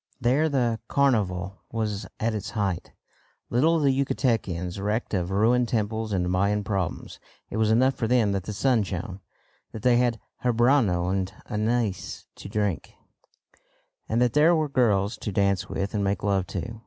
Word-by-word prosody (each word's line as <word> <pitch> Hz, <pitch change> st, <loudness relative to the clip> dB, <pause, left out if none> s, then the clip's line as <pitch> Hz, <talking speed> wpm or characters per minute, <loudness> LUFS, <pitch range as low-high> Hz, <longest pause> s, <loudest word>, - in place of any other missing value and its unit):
There 135 Hz, +6 st, +2 dB
the 120 Hz, -5 st, 0 dB
carnival 100 Hz, -9 st, +1 dB
was 105 Hz, -3 st, -2 dB
at 115 Hz, +1 st, 0 dB
its 105 Hz, -3 st, -4 dB
height. 95 Hz, -5 st, -2 dB, 0.6 s
Little 155 Hz, +8 st, +3 dB
the 145 Hz, -3 st, +3 dB
Yucatecans 110 Hz, -, -1 dB
recked 105 Hz, +3 st, -2 dB
of 90 Hz, -3 st, 0 dB
ruined 115 Hz, +5 st, +2 dB
temples 110 Hz, -1 st, -1 dB
and 90 Hz, -3 st, 0 dB
Mayan 100 Hz, +3 st, +1 dB
problems. 95 Hz, -3 st, -3 dB, 0.3 s
It -, -, -3 dB
was 110 Hz, -1 st, +2 dB
enough 130 Hz, +4 st, +4 dB
for 115 Hz, -, -2 dB
them 115 Hz, -4 st, +3 dB
that 95 Hz, -2 st, -2 dB
the -, -, -4 dB
sun 120 Hz, +2 st, +2 dB
shone, 95 Hz, -1 st, -5 dB, 0.5 s
that 110 Hz, -, -7 dB
they 125 Hz, -1 st, +5 dB
had 120 Hz, -2 st, +1 dB, 0.2 s
habanero 120 Hz, -7 st, +3 dB
and 95 Hz, -1 st, -1 dB
anise 110 Hz, -2 st, -2 dB
to -, -, -9 dB
drink, 105 Hz, -4 st, -2 dB, 1.1 s
and 115 Hz, -, +1 dB
that 125 Hz, -2 st, +2 dB
there 155 Hz, +4 st, +5 dB
were 155 Hz, -2 st, 0 dB
girls 105 Hz, -5 st, +2 dB
to 105 Hz, -, -4 dB
dance 100 Hz, -1 st, +1 dB
with 100 Hz, +2 st, -3 dB
and 105 Hz, -2 st, 0 dB
make 100 Hz, 0 st, -1 dB
love 100 Hz, -3 st, +1 dB
to. 115 Hz, -1 st, -5 dB
110 Hz, 165 wpm, -26 LUFS, 100-120 Hz, 1.1 s, they